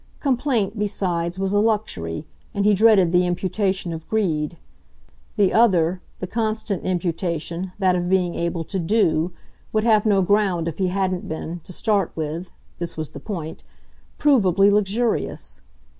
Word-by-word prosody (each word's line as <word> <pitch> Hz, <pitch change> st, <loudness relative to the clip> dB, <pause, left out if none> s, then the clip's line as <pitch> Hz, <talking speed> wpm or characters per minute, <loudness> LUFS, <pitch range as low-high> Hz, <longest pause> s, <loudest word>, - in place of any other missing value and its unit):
Complaint, 245 Hz, -7 st, 0 dB
besides, 180 Hz, -4 st, -1 dB
was 195 Hz, 0 st, -1 dB
a 205 Hz, -, +3 dB
luxury, 205 Hz, -, -1 dB, 0.3 s
and 200 Hz, 0 st, +1 dB
he 210 Hz, -, +5 dB
dreaded 200 Hz, -4 st, +5 dB
the 180 Hz, 0 st, +3 dB
imputation 185 Hz, 0 st, -1 dB
of 160 Hz, 0 st, -8 dB
greed. 170 Hz, -7 st, 0 dB, 0.8 s
The 200 Hz, -3 st, +3 dB
other, 180 Hz, -6 st, +3 dB, 0.2 s
the -, -, -3 dB
constant 215 Hz, -1 st, -2 dB
imputation, 175 Hz, 0 st, -2 dB
that 185 Hz, -2 st, +2 dB
of 175 Hz, 0 st, -1 dB
being 180 Hz, -2 st, +2 dB
able 170 Hz, 0 st, -2 dB
to 190 Hz, +4 st, -4 dB
"do," 170 Hz, -3 st, +2 dB, 0.4 s
would 215 Hz, -1 st, +1 dB
have 220 Hz, -2 st, +4 dB
no 195 Hz, -2 st, +4 dB
ground 190 Hz, -4 st, +2 dB
if 165 Hz, -, -5 dB
he 190 Hz, -, +2 dB
hadn't 185 Hz, +1 st, -1 dB
been, 165 Hz, +2 st, -5 dB
to -, -, -9 dB
start 200 Hz, 0 st, 0 dB
with 160 Hz, +3 st, -4 dB, 0.3 s
this 170 Hz, -1 st, -5 dB
was 155 Hz, -2 st, -4 dB
the 140 Hz, -, -8 dB
point 160 Hz, -2 st, -6 dB, 0.5 s
provably 200 Hz, -, +4 dB
luxurious. 205 Hz, -, -1 dB
185 Hz, 150 wpm, -22 LUFS, 170-210 Hz, 0.8 s, he